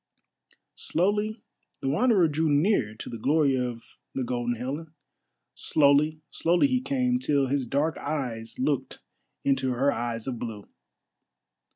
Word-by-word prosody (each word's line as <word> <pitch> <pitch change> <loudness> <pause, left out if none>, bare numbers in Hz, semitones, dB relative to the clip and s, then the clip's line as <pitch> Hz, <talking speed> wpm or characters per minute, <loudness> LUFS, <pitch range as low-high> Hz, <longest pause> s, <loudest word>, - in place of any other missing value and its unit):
Slowly 210 +4 0 0.4
the - - -2
Wanderer 195 - +4
drew 155 +1 0
near 145 - +2
to - - -9
the 115 - -6
glory 140 +2 +3
of 125 -2 -5 0.2
the 130 - -1
Golden 120 -1 -1
Helen—slowly, 150 +2 0
slowly 175 +8 +3
he 255 -2 +1
came, 255 -2 0
till 145 - +2
his 135 -1 -1
dark 145 +5 0
eyes 120 -7 -4
looked 135 +1 -2 0.4
into 130 -2 +1
her 135 +4 +2
eyes 120 -3 -3
of 125 -3 -4
blue. 110 -4 -6
140 Hz, 130 wpm, -27 LUFS, 125-165 Hz, 0.4 s, Wanderer